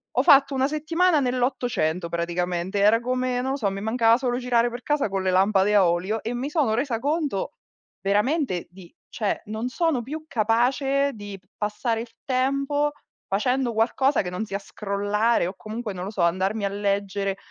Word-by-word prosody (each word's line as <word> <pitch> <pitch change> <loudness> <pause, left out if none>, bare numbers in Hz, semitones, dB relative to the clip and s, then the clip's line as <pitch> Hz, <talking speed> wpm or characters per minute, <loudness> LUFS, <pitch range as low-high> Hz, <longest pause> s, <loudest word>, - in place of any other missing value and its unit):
ho - - +3
fatto 275 0 +6
una 265 +1 +2
settimana 315 +3 +2
nell'Ottocento 245 - -1
praticamente, 175 +3 -2
era 210 +3 +5
come 255 +1 -1
non 265 +1 -2
lo 275 - -1
so, 210 -7 0
mi 195 - -5
mancava 225 +1 +3
solo 245 -1 -1
girare 240 -1 +2
per 240 +1 -7
casa 295 -4 +1
con 195 -1 -2
le 185 - +1
lampade 195 +2 +3
a 195 -4 +6
olio, 185 +6 -1
e 230 +2 -3
mi 255 +4 -3
sono 295 -8 +1
resa 240 -1 -1
conto, 290 - -1 0.5
veramente 205 - 0
di 180 -1 -15 0.2
cioè, 215 -4 -2
non 220 +4 -4
sono 320 -4 0
più 310 +5 -6
capace 270 +4 +1
di 205 -3 -8
p 185 - -38
passare 225 +2 -1
il 235 - -9
tempo 275 +2 +1 0.4
facendo 250 +5 0
qualcosa 255 +5 +2
che 180 - -4
non 180 +4 -3
sia 200 -1 -4
scrollare, 205 +1 0
o 185 - -5
comunque 215 +1 -6
non 180 -1 -6
lo 200 - -5
so, 205 - -10
andarmi 190 +5 +1
a - - 0
leggere 200 -1 -1
225 Hz, 180 wpm, -24 LUFS, 195-260 Hz, 0.5 s, fatto